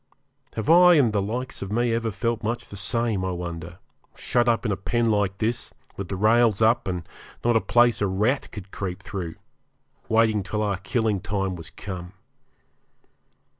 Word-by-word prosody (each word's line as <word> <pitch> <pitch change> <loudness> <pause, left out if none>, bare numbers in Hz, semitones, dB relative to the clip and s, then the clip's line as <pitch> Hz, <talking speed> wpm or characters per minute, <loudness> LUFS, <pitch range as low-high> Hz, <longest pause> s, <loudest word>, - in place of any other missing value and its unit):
Have 110 - -3
I 175 +1 +7
and 125 -8 +3
the 100 - +2
likes 120 +6 -4
of 100 - -5
me 120 +1 +1
ever 115 0 0
felt 115 +1 -2
much 115 +2 -2
the - - -9
same, 100 +1 0
I 95 - -1
wonder, 85 -1 -6 0.4
shut 120 -1 +1
up 115 +1 +1
in 105 - +1
a - - +1
pen 120 +4 -1
like 100 -2 0
this, 115 +3 -2 0.2
with 100 - -5
the 95 - -3
rails 110 +1 +4
up, 115 0 +3
and 90 -3 -3 0.4
not 120 -1 +3
a 115 - +4
place 120 -2 +3
a 100 - +2
rat 105 +9 0
could 100 -2 -9
creep 95 -1 -5
through, 90 -4 -5 0.7
waiting 110 -2 +3
till 105 +3 -2
our 100 -3 0
killing 110 +1 0
time 95 -2 -2
was 80 -1 -9
come? 90 0 -7
105 Hz, 180 wpm, -25 LUFS, 95-115 Hz, 0.7 s, I